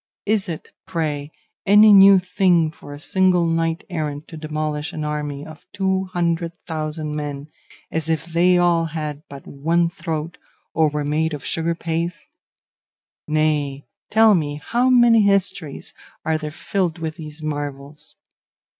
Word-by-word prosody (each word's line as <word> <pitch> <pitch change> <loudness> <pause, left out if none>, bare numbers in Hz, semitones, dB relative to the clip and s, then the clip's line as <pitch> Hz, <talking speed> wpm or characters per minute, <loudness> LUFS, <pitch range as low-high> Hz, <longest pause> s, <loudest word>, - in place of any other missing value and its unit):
Is 205 -2 0
it, 160 - -7 0.2
pray, 155 -5 -2 0.3
any 210 +1 +7
new 195 0 +9
thing 180 -3 +2
for 145 - -13
a 145 - -8
single 180 +1 +2
knight 165 +1 0
errant 155 -4 -4
to - - -9
demolish 155 -1 -3
an 155 - -4
army 150 -1 -4
of 155 0 -13
two 190 -1 0
hundred 170 -2 -1
thousand 155 -2 -4
men, 145 0 -5 0.4
as 160 0 -3
if 160 0 0
they 175 +2 +3
all 175 -1 +3
had 150 -2 -5
but 140 -1 -10
one 165 +4 0
throat 165 -3 -5 0.3
or 160 -2 +3
were 150 0 -3
made 155 +1 0
of 145 - -10
sugar 165 +1 -1
paste? 165 -1 -3 1.0
Nay, 150 -3 0 0.2
tell 220 0 +6
me, 150 -5 0
how 245 +2 +2
many 240 -3 +6
histories 195 -6 0 0.3
are 160 0 +1
there 155 -1 -4
filled 175 +2 -2
with 160 -1 -5
these 155 -1 -9
marvels? 145 -1 -6
160 Hz, 145 wpm, -21 LUFS, 150-180 Hz, 1.0 s, new